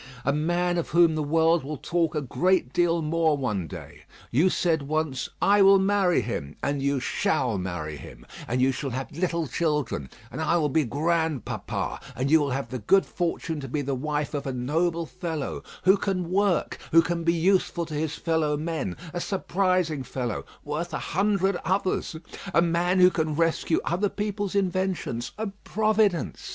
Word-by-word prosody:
A 140 - +2
man 175 +3 +1
of 170 - -3
whom 170 0 +5
the 155 - -1
world 160 +2 +3
will 150 +2 -5
talk 165 +3 0
a 150 - 0
great 170 +1 +1
deal 170 -1 +2
more 160 -1 +2
one 105 - -2
day. - - -10 0.3
You 155 +10 +4
said 165 -4 +1
once, 150 -2 -2
'I 205 +1 +5
will 195 0 +8
marry 190 -4 +3
him;' 75 -11 -4
and 140 -1 0
you 140 0 +1
shall 125 -4 0
marry 85 -5 -4
him, - - -12 0.2
and 125 +2 +1
you 135 - +4
shall 135 +2 -4
have 130 +2 -4
little 170 0 -1
children, 150 - -1 0.2
and - - -5
I 170 +2 +2
will 150 -3 +1
be 155 +1 +2
grandpapa; 160 +1 -1 0.2
and 135 +3 -1
you 160 - +7
will 145 -2 0
have 135 +1 -3
the 130 - -4
good 190 - +4
fortune 165 -2 -2
to 135 - -6
be 145 +3 -2
the 140 0 -2
wife 150 +3 -2
of 140 -1 -3
a - - -1
noble 165 +7 0
fellow, 165 -4 -4 0.2
who 190 +2 +6
can 185 -3 -2
work, 195 -3 +1
who 165 +1 +7
can 170 0 -2
be 170 0 +3
useful 175 0 +1
to 155 - -8
his 155 +1 -2
fellow 160 -3 0
men; 155 - -3 0.2
a 175 - -2
surprising 185 -5 0
fellow, 125 -3 -4 0.2
worth 155 +3 -3
a - - -5
hundred 195 0 +2
others; 185 -1 0 0.4
a 170 - +6
man 175 +2 +1
who 180 0 +7
can 155 -3 -1
rescue 165 0 +1
other 190 +4 +1
people's 205 -1 -3
inventions, 185 -10 -1
a 220 - -2 0.2
providence! 215 -4 +1
160 Hz, 180 wpm, -26 LUFS, 140-180 Hz, 0.4 s, will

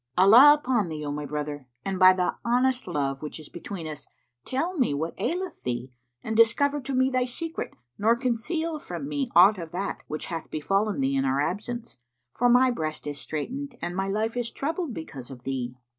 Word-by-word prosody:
Allah 235 +11 +9
upon 245 - 0
thee, 155 -1 -5
O 145 - -2
my 145 0 -4
brother, 145 -2 -4 0.2
and 195 -1 -2
by 185 0 +9
the 185 -1 0
honest 250 +1 +1
love 140 -5 -2
which 150 +1 -5
is 155 - -11
between 175 0 -7
us, 150 -2 -7 0.4
tell 330 +8 -1
me 235 - +2
what 160 +3 -2
aileth 360 0 -2
thee 125 +1 -3 0.3
and 220 - -3
discover 280 +6 +4
to 270 +1 -3
me 260 +1 +3
thy 255 -1 +1
secret, 325 +6 -5 0.2
nor 225 +3 +4
conceal 275 +7 -1
from 285 -2 -6
me 285 -3 -2
aught 190 +3 +7
of 165 -1 -6
that 195 +3 -3
which 155 - -4
hath 165 -2 -5
befallen 195 +5 0
thee 135 +1 +1
in 135 - +2
our 135 +1 +1
absence; 220 +9 -3 0.4
for 245 0 +2
my 250 +1 +5
breast 155 -10 -4
is 145 -1 -4
straitened 255 - -5
and 175 +1 -4
my 195 +1 -1
life 220 +3 -1
is 240 -1 -1
troubled 320 +3 -3
because 140 -6 -8
of 125 -2 -11
thee." 125 -2 -3
200 Hz, 200 wpm, -26 LUFS, -, 0.4 s, Allah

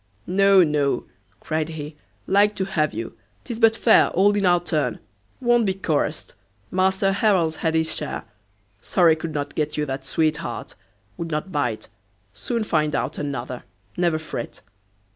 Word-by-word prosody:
"No, 195 0 +5
no," 150 -3 +1 0.4
cried 155 0 -2
he, 150 -1 -7 0.3
"like 205 +2 +3
to 190 - -1
have 155 -6 0
you, 115 +1 -6 0.3
'tis 235 -3 -6
but 225 -1 +5
fair, 230 - +5
all 200 +3 +3
in 200 -2 +2
our 175 0 +4
turn; 150 -9 -1 0.4
won't 240 -3 +3
be 190 - 0
chorused; 160 -4 -2 0.4
Master 190 +1 +2
Harrel's 190 -6 +2
had 160 0 0
his 160 0 +1
share. - - -4 0.6
Sorry 165 +4 +4
could 160 -1 -6
not 145 0 -3
get 150 -1 -2
you 150 - 0
that 135 -1 -4
sweetheart! 155 -3 -2 0.4
would 165 -1 -4
not 155 +5 -3
bite; 125 -8 -2 0.5
soon 230 - -2
find 155 -6 0
out - - -2
another; 130 -4 -4 0.3
never 170 -3 +1
fret." 155 -6 -6
160 Hz, 155 wpm, -23 LUFS, 150-195 Hz, 0.6 s, No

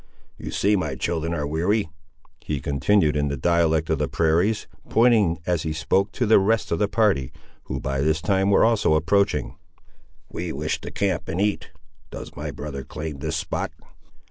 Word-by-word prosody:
You - - -6
see 105 +2 +2
my 80 -8 -2
children 80 +4 -2
are 80 -4 -2
weary," 85 +7 0 0.6
he 75 -2 -2
continued 75 +5 +2
in 75 0 +1
the 70 0 -2
dialect 80 +1 +2
of - - +1
the - - 0
prairies, 85 +7 +1 0.2
pointing, 110 -8 +4
as 90 -3 0
he 80 0 -2
spoke, 95 +5 +1
to 125 - 0
the 110 -1 +6
rest 110 +2 +1
of 85 - 0
the 105 - +2
party, 100 - +1 0.3
who, - - -4
by 70 0 -2
this 80 +2 +1
time, 95 +2 +1
were 100 - +5
also 110 -8 +3
approaching. 100 +5 +1 0.7
"We 85 0 -5
wish 75 +2 -2
to - - -6
camp 95 -3 -1
and 85 - -2
eat. 105 0 0 0.4
Does - - -9
my - - -5
brother 70 -2 -6
claim 75 0 -6
this 80 +2 -3
spot?" 80 - -3
85 Hz, 180 wpm, -24 LUFS, 75-100 Hz, 0.7 s, the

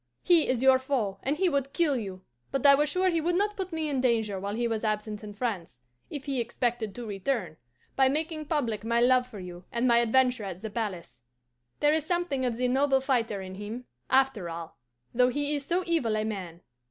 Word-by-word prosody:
He 345 -3 +5
is 255 -1 0
your 265 -1 +6
foe, 245 -8 -1
and 285 +3 -1
he 380 +2 +2
would 275 -4 -1
kill 325 -5 +2
you; 190 -6 -5 0.3
but 275 0 -1
I 280 - +9
was 295 +2 +3
sure 370 +3 +2
he 335 -1 +1
would 345 +2 0
not 415 +2 +1
put 375 -2 -4
me 320 -1 -2
in 275 -3 0
danger 220 -6 +1
while 200 +2 -3
he 240 +1 0
was 225 -1 -2
absent 215 -1 -2
in 210 - -7
France 200 - -3 0.3
if 290 -2 -6
he 270 -3 -1
expected 235 -3 -2
to 245 - -6
return 200 - -2 0.4
by 265 -1 +4
making 310 +2 -2
public 240 -9 -1
my 235 +1 +1
love 250 +1 +4
for 225 - -11
you 180 -1 -9
and 235 +2 +1
my 235 -1 +5
adventure 250 0 +2
at 190 +1 -7
the 220 - -4
palace. 195 - -5 0.6
There 295 0 +4
is 315 -1 +1
something 325 -6 -1
of 235 -2 -1
the 250 +1 +1
noble 270 +1 +3
fighter 235 -7 0
in 185 0 -8
him, 210 +5 -7 0.2
after 260 -9 +2
all, 165 -6 -8 0.3
though 250 +1 +4
he 290 +3 -1
is 285 -2 -2
so 355 +2 +1
evil 290 -11 +1
a 215 - -1
man. 185 -6 -5
250 Hz, 220 wpm, -28 LUFS, 215-285 Hz, 0.6 s, I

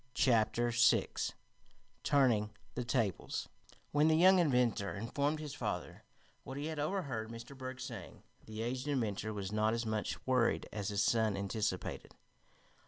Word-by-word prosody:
Chapter 120 -1 +3
Six 120 +1 +3 0.7
Turning 120 -7 +3 0.2
the 125 - -2
Tables 115 -5 -1 0.4
When 150 +1 +4
the 160 0 +4
young 185 +2 +7
inventor 125 - +2
informed 140 +8 -1
his 150 -3 -6
father - - -4 0.4
what 135 - -7
he 145 - -3
had 155 -1 -3
overheard 145 - -2
Mr. 115 +4 -9
Berg 130 0 -6
saying, 115 -8 -8 0.2
the 110 +1 -5
aged 130 +3 -3
inventor 110 -6 -1
was 100 -2 -4
not 110 +1 +2
as 115 0 -2
much 110 -1 -2
worried 125 -3 +2
as 100 -3 -3
his 105 0 +1
son 110 -2 +2
anticipated. 100 -1 -3
120 Hz, 145 wpm, -34 LUFS, 110-135 Hz, 0.7 s, young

